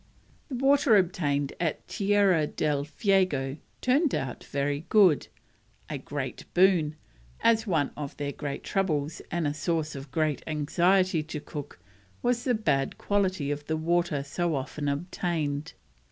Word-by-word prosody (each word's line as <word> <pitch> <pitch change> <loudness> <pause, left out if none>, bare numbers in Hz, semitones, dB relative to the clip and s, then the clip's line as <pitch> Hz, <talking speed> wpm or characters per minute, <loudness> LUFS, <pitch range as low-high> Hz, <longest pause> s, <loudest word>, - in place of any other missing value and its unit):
The 265 - -3
water 270 -3 +4
obtained 145 -7 0
at 165 -3 -2
Tierra 195 -6 +3
del 145 -2 -1
Fuego 155 -6 +1 0.2
turned 280 +4 +3
out 135 -5 -4
very 145 +3 -2
good: 190 -9 +5 0.6
a - - -3
great - - -5
boon, 175 -5 +4 0.5
as 225 0 +3
one 160 -7 +1
of 145 -2 -6
their 145 -1 -2
great 140 -1 -5
troubles 155 -5 -1
and 170 -2 -1
a 145 - 0
source 155 -1 -1
of 135 0 -8
great 155 0 0
anxiety 170 +4 +2
to 155 0 -6
Cook 145 -1 -8 0.5
was 240 0 +1
the 250 -2 +3
bad 140 -11 0
quality 190 -8 0
of 145 0 -4
the 160 - 0
water 170 -3 +1
so 165 +3 -1
often 145 +2 -3
obtained. 155 -1 -2
155 Hz, 140 wpm, -28 LUFS, 145-190 Hz, 0.6 s, good